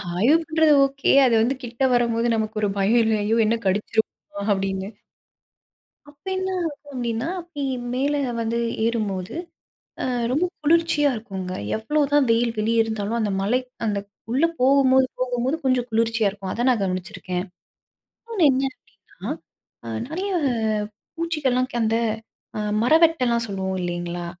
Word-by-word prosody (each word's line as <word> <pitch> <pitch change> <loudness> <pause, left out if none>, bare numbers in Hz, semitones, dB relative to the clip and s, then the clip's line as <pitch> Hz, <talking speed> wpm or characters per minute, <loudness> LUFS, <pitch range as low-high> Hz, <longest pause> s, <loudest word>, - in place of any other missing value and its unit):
ஆய்வு 240 - +4
பண்றது 315 -2 +4
ஓகே. 275 0 0
அது 245 - +3
வந்து 255 +4 +1
கிட்ட 240 +2 -3
வரும்போது 235 -1 +2
நமக்கு 220 0 -2
ஒரு 210 - +2
பயம் 215 +5 +3
இல்லயோ 220 0 +1
"என்ன 225 - +2
கடிச்சுருமோ?" 205 +1 -1
அப்படீன்னு. 195 0 -1 1.2
அப்ப 285 -1 -27
என்ன 375 0 -2
ஆகும் 295 -3 -5
அப்படீன்னா, 240 +2 -2
அப்படி 335 -4 -7 0.3
மேல 280 +3 +1 0.3
வந்து 230 +1 -1 0.3
ஏறும்போது, 205 -6 -2 0.7
அ - - -1 0.3
ரொம்ப 310 +7 +2 0.2
குளிர்ச்சியா 310 -2 +3
இருக்கும்ங்க. 190 -5 -6 0.2
எவ்வளோதான் 290 +4 +2
வெயில் 230 0 +2
வெளிய 225 +2 +3
இருந்தாலும், 220 +1 -2
அந்த 210 - 0
மலை 245 +6 +2 0.3
அந்த 205 -2 0 0.3
உள்ள 265 +7 +2 0.2
போகும்போது 265 0 +5
போகும்போது 255 +3 0
கொஞ்சம் 255 -2 +2
குளிர்ச்சியா 225 -1 +2
இருக்கும். 195 -1 -7
அத 240 - -1
நான் 240 -5 +2
கவனிச்சிருக்கேன். 185 -1 -3 0.8
இன்னொன்னு 445 -8 +1
என்ன 265 +1 0 0.4
அப்படீன்னா, - - -8 0.5
அ - - -7 0.2
நெறைய 370 +7 -3 0.9
பூச்சிகள்லாம் 285 -7 0
க் 240 - -1
அந்த 225 +1 +2 0.6
அ - - -2 0.2
மரவெட்டைலாம் 250 -5 +3
சொல்லுவோம் 190 -2 -3
இல்லைங்களா? 175 0 -3
235 Hz, 135 wpm, -23 LUFS, 210-275 Hz, 1.2 s, போகும்போது